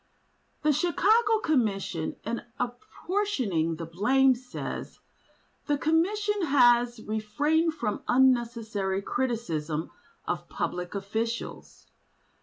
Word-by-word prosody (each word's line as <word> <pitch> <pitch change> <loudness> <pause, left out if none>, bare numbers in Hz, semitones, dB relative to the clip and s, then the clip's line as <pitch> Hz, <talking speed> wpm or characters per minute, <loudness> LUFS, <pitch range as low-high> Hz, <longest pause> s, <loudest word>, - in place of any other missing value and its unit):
The 305 - +4
Chicago 420 - +3
Commission 195 - 0
in 230 +3 -3 0.2
apportioning 250 - -1
the 165 +1 -6
blame, 255 +11 +3
says: 250 +1 -6 0.7
"The 290 -1 +2
Commission 390 +5 +1
has 240 -3 +4
refrained 295 +10 0
from 215 -8 -2
unnecessary 230 -6 +2
criticism 165 -13 -2 0.4
of - - -3
public 180 +2 -3
officials. 220 +4 -4
240 Hz, 85 wpm, -28 LUFS, 205-310 Hz, 0.7 s, The